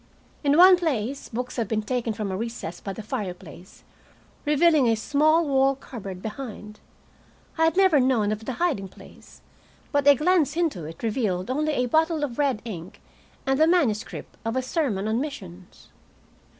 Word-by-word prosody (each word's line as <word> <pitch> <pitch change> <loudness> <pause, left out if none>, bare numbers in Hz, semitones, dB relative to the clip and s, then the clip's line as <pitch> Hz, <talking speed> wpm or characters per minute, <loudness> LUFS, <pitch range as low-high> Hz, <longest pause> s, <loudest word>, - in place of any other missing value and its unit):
In 285 +1 +3
one 365 +1 +8
place 275 -6 -2
books 250 +2 -5
had 230 -3 -1
been 215 +1 -1
taken 245 0 -2
from 210 -2 -4
a - - -2
recess 220 -5 -5
by 195 - -5
the 215 +3 -7
fireplace, 185 - -7 0.6
revealing 300 -2 +4
a 225 - +3
small 305 +7 +2
wall 270 0 +3
cupboard 195 -8 -9
behind. 215 -2 -7 0.8
I 325 - +3
had 325 +2 +1
never 375 -6 +5
known 245 -5 +2
of 215 +1 -4
the 260 - -3
hiding 285 - -1
place, - - -16 0.5
but 285 -1 +1
a 285 - +8
glance 320 0 +2
into 310 - -1
it 165 +6 -10
revealed 215 -3 -1
only 305 +3 0
a 250 - +1
bottle 315 +4 +1
of 260 -3 -4
red 275 -7 0
ink 180 -6 -8 0.5
and 270 +1 +1
the 315 - +5
manuscript 280 -12 0
of 225 +1 -2
a 260 - 0
sermon 250 - -1
on 225 +3 0
missions. 190 - -9
250 Hz, 170 wpm, -25 LUFS, 210-295 Hz, 0.8 s, one